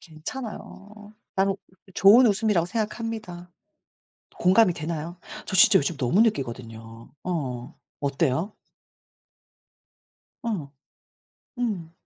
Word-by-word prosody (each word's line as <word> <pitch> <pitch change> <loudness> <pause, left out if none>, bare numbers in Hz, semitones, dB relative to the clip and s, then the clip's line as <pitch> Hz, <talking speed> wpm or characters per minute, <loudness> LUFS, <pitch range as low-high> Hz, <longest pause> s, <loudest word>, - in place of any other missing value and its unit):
괜찮아요. 205 +3 -9 0.2
나는 195 0 +1 0.4
좋은 225 +6 +7
웃음이라고 210 -5 +2
생각합니다. 215 -3 -4 0.9
공감이 185 +1 +5
되나요? 165 +2 -5 0.3
저 - - -3
진짜 190 +2 +7
요즘 150 +3 -2
너무 130 - +2
느끼거든요. 115 - -3
어. 140 -6 -4 0.2
어때요? 145 +6 0 1.9
어. 185 -12 -4 0.9
음. 205 -10 -3
180 Hz, 210 characters per minute, -25 LUFS, 150-210 Hz, 1.9 s, 좋은